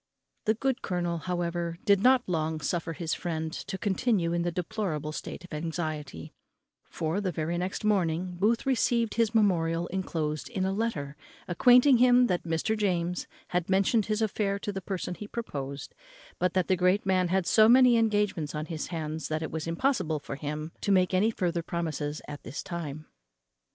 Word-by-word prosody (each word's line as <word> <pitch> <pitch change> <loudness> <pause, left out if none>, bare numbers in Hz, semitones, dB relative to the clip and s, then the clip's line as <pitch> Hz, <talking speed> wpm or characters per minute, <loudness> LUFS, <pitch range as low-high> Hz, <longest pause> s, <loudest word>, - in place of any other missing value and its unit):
The 220 0 +3
good 265 +3 -1
colonel, 175 -2 -2
however, 170 -1 -2
did 200 -3 +4
not 255 +2 +5
long 160 -2 -1
suffer 165 +2 -2
his 160 -1 -3
friend 160 -2 -3
to 190 - -5
continue 190 -3 +1
in 170 - +1
the 175 0 -1
deplorable 170 -5 -3
state 155 - -7
of 180 - -11
anxiety; 155 - -4 0.6
for, 165 +5 -2
the 190 -3 -1
very 160 +1 -2
next 185 +3 -3
morning, 180 -3 +1
Booth 225 +4 +2
received 235 -3 +1
his 230 -1 +1
memorial 170 -5 +2
enclosed 160 -4 -3
in 195 -6 -1
a 190 - 0
letter, 180 -10 -2 0.3
acquainting 245 +8 +6
him 250 +1 +6
that 180 -7 0
Mr. 165 +6 0
James 180 -4 -1 0.2
had 180 0 -1
mentioned 195 +3 +2
his 215 +1 0
affair 200 -2 0
to 205 - -4
the 195 - -4
person 185 -1 -4
he 205 +3 -8
proposed, 140 - -5 0.5
but 180 0 0
that 185 -2 +2
the 190 - +3
great 180 +3 +2
man 185 -1 +2
had 185 0 +1
so 215 +3 +6
many 250 0 +7
engagements 205 -9 +1
on 150 0 -3
his 160 -2 -4
hands 160 -2 -4
that 155 +1 -2
it - - -4
was 160 0 -4
impossible 165 - 0
for 145 -1 -6
him 150 +2 -5
to 200 - 0
make 185 -1 +3
any 195 +4 +3
further 175 -5 -1
promises 155 -3 -3
at 145 -1 -7
this 125 +5 -6
time. 155 -4 -5
180 Hz, 180 wpm, -28 LUFS, 160-210 Hz, 0.6 s, many